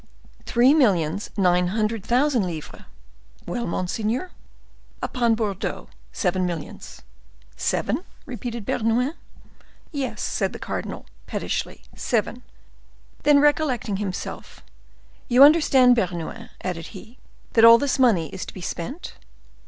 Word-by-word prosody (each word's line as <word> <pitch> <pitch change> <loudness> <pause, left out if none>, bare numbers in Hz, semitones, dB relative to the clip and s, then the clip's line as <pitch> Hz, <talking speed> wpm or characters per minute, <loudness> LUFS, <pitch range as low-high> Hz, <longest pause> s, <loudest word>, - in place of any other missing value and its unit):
"Three 245 +4 +5
millions 200 - +2
nine 180 -2 +3
hundred 215 +2 -1
thousand 245 -2 +2
livres." 160 -3 -8 0.6
"Well, 240 -1 -3
monseigneur?" 220 - -2 0.7
"Upon 235 -3 +1
Bordeaux, 210 -4 -3 0.2
seven 185 - 0
millions." 165 -4 -7 0.5
"Seven?" - - -1 0.2
repeated 235 -3 -6
Bernouin. 240 +7 0 0.8
"Yes," 280 -5 -4
said - - -1
the - - -6
cardinal, - - -5 0.2
pettishly, - - -4
"seven." 240 +1 -1 0.8
Then, 290 -1 +5
recollecting 290 -9 +1
himself, 195 -2 -6 0.6
"You 250 +3 +7
understand, 280 -5 +6
Bernouin," 185 +2 -3
added 170 -3 -4
he, 225 +6 -14 0.3
"that 225 - +4
all 230 0 +10
this 280 0 -1
money 200 - +3
is 190 - -6
to - - -10
be 185 - -8
spent?" 220 - -6
225 Hz, 115 wpm, -23 LUFS, 185-255 Hz, 0.8 s, all